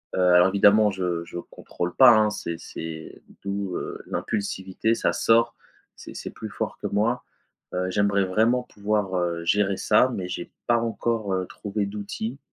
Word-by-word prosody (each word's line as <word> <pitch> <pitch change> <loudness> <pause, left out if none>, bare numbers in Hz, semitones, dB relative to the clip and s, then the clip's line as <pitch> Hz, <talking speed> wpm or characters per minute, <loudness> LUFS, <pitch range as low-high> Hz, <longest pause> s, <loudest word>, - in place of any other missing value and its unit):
heu, - - -1
alors 90 +1 +7
évidemment 105 +2 +5
je 90 -3 -2
je 85 - -8
contrôle 90 0 -5
pas, 125 -4 +8
hein. 105 -1 +3
C'est 85 -5 -4
c'est 80 -1 -8 0.2
d'où, 100 -2 -3
heu, - - -6
l'impulsivité. 100 +2 -2
Ça - - 0
sort, 115 +1 +3 0.4
c'est - - -11
c'est - - -6
plus - - -8
fort - - -4
que - - -2
moi, 115 +4 0 0.5
heu, 90 0 -1
j'aimerais 100 0 +2
vraiment 115 +7 +2
pouvoir, 105 -4 -2
heu, 85 -1 -1
gérer 100 +1 +2
ça 110 +4 +4
mais 90 -2 -4
j'ai 90 -1 -6
pas 120 - +3
encore, 115 -2 -2
heu, 95 -1 -1
trouvé 100 0 -3
d'outils 105 +5 -5
100 Hz, 170 wpm, -25 LUFS, 90-110 Hz, 0.5 s, pas